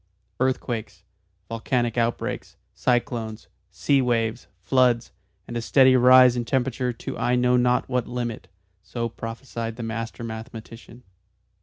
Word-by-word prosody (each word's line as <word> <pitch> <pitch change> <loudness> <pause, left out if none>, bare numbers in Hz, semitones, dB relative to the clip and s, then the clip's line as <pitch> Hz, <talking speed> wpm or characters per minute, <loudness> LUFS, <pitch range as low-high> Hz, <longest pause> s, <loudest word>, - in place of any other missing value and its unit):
"Earthquakes, 125 -3 -2 0.4
volcanic 115 +1 -1
outbreaks, 115 -1 -2 0.2
cyclones, 120 -3 -1 0.2
sea 140 -1 +1
waves, 115 -2 -1 0.2
floods, 125 +2 +2 0.4
and 120 - -7
a 120 - -1
steady 130 +2 +5
rise 125 0 +7
in 120 - -1
temperature 125 0 -1
to 115 - -7
I 125 - +2
know 125 0 +3
not 125 0 +2
what 125 -2 -1
limit" 120 -2 -4 0.3
so 115 +4 -4
prophesied 115 0 -6
the 120 - -6
master 115 +1 -5
mathematician. 115 +1 -9
120 Hz, 125 wpm, -24 LUFS, 115-125 Hz, 0.4 s, rise